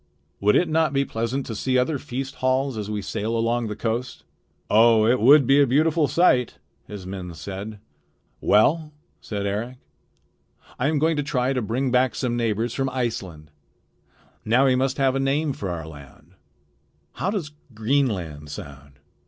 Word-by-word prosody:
"Would 105 +1 +3
it 175 - +3
not 160 -2 +1
be 140 0 +1
pleasant 120 +3 -3
to 115 - -5
see 130 +4 0
other 135 +3 0
feast 135 0 -5
halls 130 0 0
as 105 -1 -5
we 105 -1 -3
sail 110 +4 -2
along 115 +1 0
the 105 - -4
coast?" 115 +3 -3 0.4
"Oh! 110 0 +5
it 120 +3 +3
would 140 +5 +6
be 140 +3 +5
a 140 - +4
beautiful 155 +4 +2
sight," 130 -9 +2 0.3
his 100 -3 -8
men 90 -2 -7
said. 100 +6 -7 0.6
"Well," 150 +8 +2 0.3
said 100 -2 -5
Eric, 110 +6 -3 1.0
"I 130 - +1
am 155 0 +1
going 160 +2 +1
to - - +1
try 135 -2 0
to 125 - -1
bring 125 +4 -1
back 125 -1 +2
some 125 -3 -1
neighbors 115 0 -1
from 135 -1 -1
Iceland. 95 - -4 0.9
Now 125 +5 +3
we 130 -1 +4
must 130 +1 0
have 135 -2 +2
a - - 0
name 140 +2 0
for 100 -6 -5
our 85 -3 -4
land. 70 -4 -14 0.8
How 190 - -3
does 190 -8 -3 0.2
Greenland 105 - -1
sound?" 70 -1 -10
125 Hz, 170 wpm, -23 LUFS, 105-135 Hz, 1.0 s, would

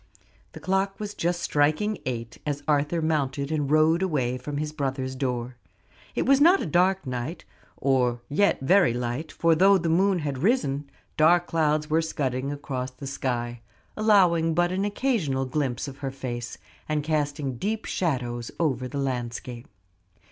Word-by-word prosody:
The - - -9
clock 195 +1 -1
was 210 -1 -5
just 175 -1 -1
striking 155 +9 +1
eight 115 -2 -4
as 145 -1 -3
Arthur 150 +2 +1
mounted 140 -2 -1
and 150 -3 -1
rode 155 +3 +4
away 135 -9 0
from 145 +3 -5
his 150 0 -2
brother's 135 -3 -2
door. 125 -2 -3 0.6
It - - 0
was 275 +1 +4
not 350 +6 +6
a - - -2
dark 185 +3 +2
night, 130 +6 -4 0.3
or 125 -3 +1
yet 200 +5 +2
very 170 -2 +4
light; 125 +6 -3
for 165 0 +2
though 195 +4 +5
the 170 -2 -1
moon 190 +3 +3
had 145 -5 -3
risen, 145 - 0 0.3
dark 170 +3 +5
clouds 155 -2 +1
were 160 +1 +2
scudding 135 -4 -2
across 135 -3 -4
the 130 +2 -11
sky, 120 -3 -3 0.3
allowing 180 -7 +4
but 175 +1 +2
an 190 +2 0
occasional 205 - 0
glimpse 130 -2 -2
of 140 0 -9
her 135 - -3
face, 125 -3 -5 0.3
and 150 -1 0
casting 145 -4 -1
deep 215 - -2
shadows 120 -8 -2
over 130 -6 0
the 140 - -6
landscape. 125 -2 -4
150 Hz, 160 wpm, -26 LUFS, 130-175 Hz, 0.6 s, not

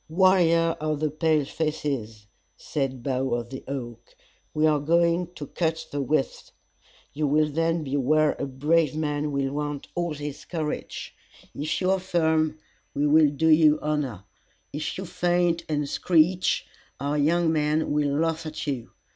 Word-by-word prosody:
"Warrior 170 -2 +4
of 155 -1 -1
the 155 -1 0
pale 155 -1 +1
faces," 135 -9 -3 0.3
said 135 -5 -3
Bough 130 -1 0
of 120 0 -5
the 130 - -7
Oak, 120 -4 -7 0.4
"we 155 +1 +1
are 155 -2 +3
going 170 +3 +2
to 145 - -6
cut 160 +1 -2
the 145 - -2
withe. 135 +1 -1 0.6
You 150 +1 0
will 150 +1 +2
then 165 +1 0
be 140 -1 -3
where 155 +3 +3
a - - -2
brave 150 +3 +1
man 150 -1 -1
will 140 -1 -1
want 145 -1 -4
all 170 -3 -2
his 145 -1 -6
courage. 160 -4 -5 0.4
If 150 +2 -2
you 185 0 +2
are 190 - +2
firm, 160 -4 +1 0.4
we 145 - +1
will 150 0 +5
do 160 +3 +1
you 155 -1 +6
honor; 145 -10 -2 0.5
if 150 +1 -3
you 190 - -5
faint 175 -1 0
and 150 -2 0
screech, 175 +4 +2 0.3
our 145 +2 -1
young 165 +2 +2
men 155 0 +1
will 145 -1 +1
laugh 165 0 -1
at 155 -1 -5
you. 135 -6 -3
155 Hz, 160 wpm, -25 LUFS, 145-165 Hz, 0.6 s, you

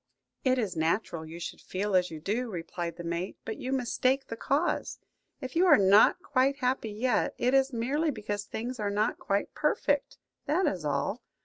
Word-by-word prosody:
"It 255 -1 +3
is 210 -8 -1
natural 165 0 -1
you 165 +2 -8
should - - -6
feel 200 +1 -2
as 180 -1 +3
you 160 - -7
do," 225 +9 -2
replied 170 -2 -5
the 175 - -8
mate; 170 +3 -3
"but 220 - -4
you 255 - -4
mistake 260 +1 +1
the 230 - -6
cause. 285 +8 0 0.4
If 260 +1 -6
you 360 +3 +4
are 310 - +8
not 200 - +5
quite 275 0 +2
happy 255 -4 0
yet, 220 +3 0
it 250 +2 +1
is 270 0 +4
merely 270 +7 0
because 210 -5 -3
things 240 +4 -5
are 205 -1 0
not 210 +2 0
quite 200 0 -1
perfect, 290 -1 0 0.3
that 360 +5 +2
is 180 -4 -1
all. 145 - -1
225 Hz, 190 wpm, -29 LUFS, 185-265 Hz, 0.4 s, are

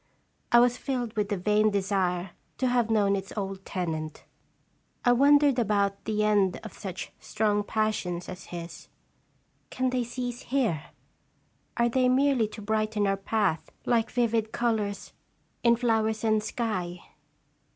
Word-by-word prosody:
I 240 - +7
was 245 0 +4
filled 245 -5 -3
with 210 -1 0
the 205 - 0
vain 210 +3 +3
desire 190 -3 0 0.3
to 260 - 0
have 240 -2 +2
known 205 -3 +3
its 195 0 -5
old 195 -1 -4
tenant. 160 -4 -4 0.8
I 245 - +6
wondered 280 +1 +5
about 200 -3 0
the 215 -1 0
end 205 -3 +2
of 220 - -8
such 190 -3 -6
strong 210 -1 0
passions 205 -5 -1
as 185 -1 -8
his. 170 -1 -8 0.8
Can 255 0 -1
they 250 -1 0
cease 245 0 -5
here? 230 - 0 0.9
Are 235 0 +3
they 255 +1 +2
merely 260 -3 +3
to 215 0 -10
brighten 215 0 0
our 195 0 +2
path, 195 -3 -1 0.2
like 230 -2 +2
vivid 230 -2 0
colors 215 -4 -1 0.5
in 235 -1 +5
flowers 220 -2 0
and 215 -1 +3
sky 185 -6 -3
215 Hz, 140 wpm, -27 LUFS, 195-240 Hz, 0.9 s, I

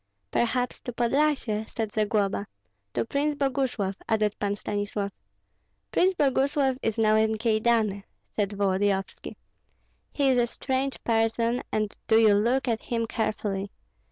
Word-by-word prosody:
"Perhaps 245 +1 0
to 245 - -6
Podlyasye?" 240 -3 +1
said 220 -2 -3
Zagloba. 205 -1 0 0.5
"To - - +1
Prince 290 +4 0
Boguslav," 260 -8 -1
added 215 -2 +2
Pan 205 0 0
Stanislav. 205 -1 -3 0.8
"Prince 375 +1 +3
Boguslav 270 -2 +2
is 225 0 -1
now 215 -1 +4
in 220 0 +2
Kyedani," 220 -2 +1 0.3
said 205 -2 +1
Volodyovski. 195 -1 -1 0.8
"He 280 -2 +2
is 255 -2 +4
a 240 - +2
strange 265 +2 -2
person, 230 +1 +1
and 215 -1 -1
do 220 - +5
you 220 -2 +6
look 240 +6 +2
at 225 -2 0
him 230 -1 -2
carefully. 210 -3 -2
225 Hz, 130 wpm, -27 LUFS, 205-255 Hz, 0.8 s, you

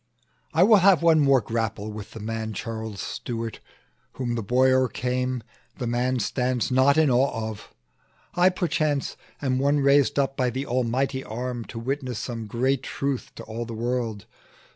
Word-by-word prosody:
"I 165 - +4
will 215 +2 +7
have 190 -3 +5
one 165 -2 +5
more 140 -3 +5
grapple 110 -1 -3
with 105 -1 -8
the 115 - -8
man 110 0 -4
Charles 110 -1 -5
Stuart: 115 +2 -5 0.5
whom 120 -2 -3
the 115 - -1
boy 125 +5 +3
o'ercame, 125 -1 0 0.3
The 125 - -3
man 125 +2 0
stands 125 +2 -1
not 130 +3 +4
in 155 -4 +4
awe 120 -3 +1
of. 105 - -12 0.6
I, 180 +1 +5
perchance, 155 -6 -1 0.3
Am 130 -2 +1
one 140 +2 +2
raised 140 +1 +4
up 135 -1 +1
by 125 -1 +1
the 130 +3 -3
Almighty 130 +2 0
arm 120 +1 -4
To 115 - -9
witness 130 0 -3
some 115 -2 -5
great 130 +4 0
truth 140 -1 -3
to - - -8
all 115 +2 -5
the 115 -1 -7
world. 115 -2 -2
125 Hz, 165 wpm, -25 LUFS, 115-135 Hz, 0.6 s, will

